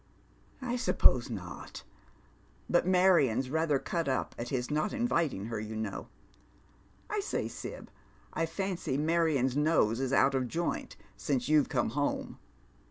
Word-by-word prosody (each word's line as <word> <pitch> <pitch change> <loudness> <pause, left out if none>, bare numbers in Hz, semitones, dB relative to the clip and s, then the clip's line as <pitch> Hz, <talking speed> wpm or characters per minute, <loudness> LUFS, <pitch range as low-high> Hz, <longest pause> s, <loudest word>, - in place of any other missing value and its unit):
" - - -33 0.2
I 245 -1 -1
suppose 130 - +3
not; 90 -6 -7 0.9
hut 175 - +4
Marion's 170 -10 +4
ratlier 155 -2 +1
cut 170 -3 -1
up 130 - -1
at 120 +1 -5
his 125 0 -2
not 155 +7 0
inviting 170 - 0
her, 115 -1 -3
you 110 +1 -6
know. 110 -2 -4 1.0
I 420 - -2
say, 405 - -2
Sib, - - -8 0.4
I 165 - 0
fancy 180 -5 -2
Marion's 155 -5 +2
nose 145 -7 +2
is 135 -1 -1
out 135 0 +4
of 130 -2 0
joint 170 +7 -3 0.2
since 130 +4 -1
you've 150 -2 +4
come 120 - +1
home." 145 +3 -2
145 Hz, 145 wpm, -31 LUFS, 125-170 Hz, 1.0 s, hut